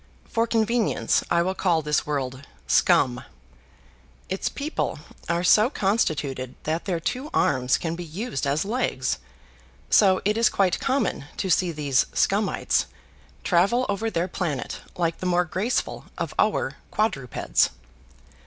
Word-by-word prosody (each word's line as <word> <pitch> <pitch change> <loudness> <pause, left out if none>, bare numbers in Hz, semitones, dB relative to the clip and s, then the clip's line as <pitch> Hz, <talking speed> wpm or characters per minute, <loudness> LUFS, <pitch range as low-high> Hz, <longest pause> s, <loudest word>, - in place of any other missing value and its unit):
For 230 0 0
convenience, 225 0 +1
I 170 0 +3
will 185 +2 -1
call 175 -4 +1
this 150 0 0
world 135 -2 -3 0.2
Scum. 125 0 +3 1.1
Its 190 - -1
people 290 - -3 0.3
are 170 +1 +1
so 210 +5 +5
constituted 150 - -1
that 160 +2 -2
their 180 -4 -1
two 255 - -3
arms 130 -1 +2
can 165 -1 -3
be 175 - -6
used 165 - -4
as 145 +6 0
legs; 215 - -1 0.7
so 190 -3 +5
it 210 +2 +2
is 230 - +5
quite 190 -3 +1
common 265 - 0
to 190 - -1
see 175 +1 +3
these 145 -5 +1
Scumites - - +1 0.6
travel 220 +9 +3
over 205 +3 -1
their 175 -3 -1
planet 160 -8 -3 0.2
like 165 -2 0
the 185 - -2
more 175 0 +2
graceful 195 +9 -2
of - - -3
our - - +1
quadrupeds. 135 - +1
175 Hz, 135 wpm, -25 LUFS, 150-215 Hz, 1.1 s, so